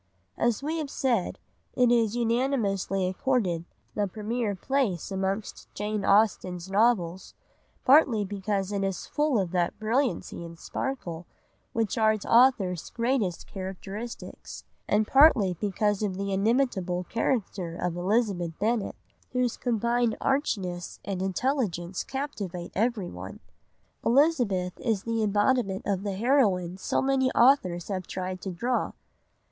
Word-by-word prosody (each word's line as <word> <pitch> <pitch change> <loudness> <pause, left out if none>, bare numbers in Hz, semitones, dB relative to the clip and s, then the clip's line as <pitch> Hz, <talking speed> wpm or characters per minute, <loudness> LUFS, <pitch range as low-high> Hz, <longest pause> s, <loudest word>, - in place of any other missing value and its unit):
As 235 +2 0
we 320 +3 -1
have 300 -3 -3
said, 240 -9 0 0.4
it 245 -1 +4
is 230 -2 +3
unanimously 230 -6 0
accorded 185 - 0 0.3
the 205 -1 0
premier 215 +2 -2
place 210 - -1
amongst 195 +2 -3
Jane 210 0 -2
Austen's 190 -3 +2
novels, 195 -5 +1 0.5
partly 255 -7 +5
because 200 0 -2
it 200 -1 -1
is 195 -1 -2
full 295 -4 +1
of 185 -3 -1
that 175 -2 0
brilliancy 220 -5 -1
and 170 0 -9
sparkle 175 -8 -4 0.4
which 225 0 -1
are 220 0 +5
its 215 - -5
author's 230 -8 +3
greatest 230 -7 -1
characteristics, 195 +4 -7 0.2
and 210 +1 +2
partly 250 - +6
because 205 +2 0
of 195 -3 -1
the 200 0 -2
inimitable 195 -4 +1
character 195 -5 -2
of 175 -1 -2
Elizabeth 180 -3 0
Bennet, 220 0 0 0.4
whose 250 -2 +1
combined 235 -1 0
archness 190 - -1
and 190 -2 -3
intelligence 190 - -1
captivate 205 - -5
everyone. 215 -3 -2 0.6
Elizabeth 235 - +2
is 215 -4 -1
the 230 -1 -1
embodiment 205 -1 +1
of 195 -2 0
the 200 -1 -3
heroine 200 -7 +2
so - - 0
many 265 -1 +2
authors 200 - +3
have 185 -2 -3
tried 185 -1 -4
to 195 - -4
draw. 240 +8 -1
210 Hz, 125 wpm, -27 LUFS, 185-240 Hz, 0.6 s, partly